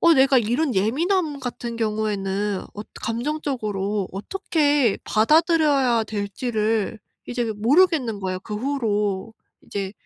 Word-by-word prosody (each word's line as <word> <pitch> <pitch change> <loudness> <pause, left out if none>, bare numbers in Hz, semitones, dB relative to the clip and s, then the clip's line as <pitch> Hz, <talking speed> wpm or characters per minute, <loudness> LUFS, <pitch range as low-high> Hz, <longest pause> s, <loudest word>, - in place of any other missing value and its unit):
어 335 -1 +6
내가 270 -1 +5
이런 245 +4 0
예민함 300 - +1
같은 240 -2 -5
경우에는 210 -3 -1
엇 210 +1 -9
감정적으로 225 -6 -2
어떻게 290 - +1
받아들여야 285 -2 +3
될지를 215 +1 -2 0.3
이제 240 -2 -2
모르겠는 255 - +3
거야. 185 -1 -3
그 210 +3 -7
후로 215 -5 -1 0.3
이제 195 -1 -5
230 Hz, 265 characters per minute, -23 LUFS, 210-285 Hz, 0.3 s, 어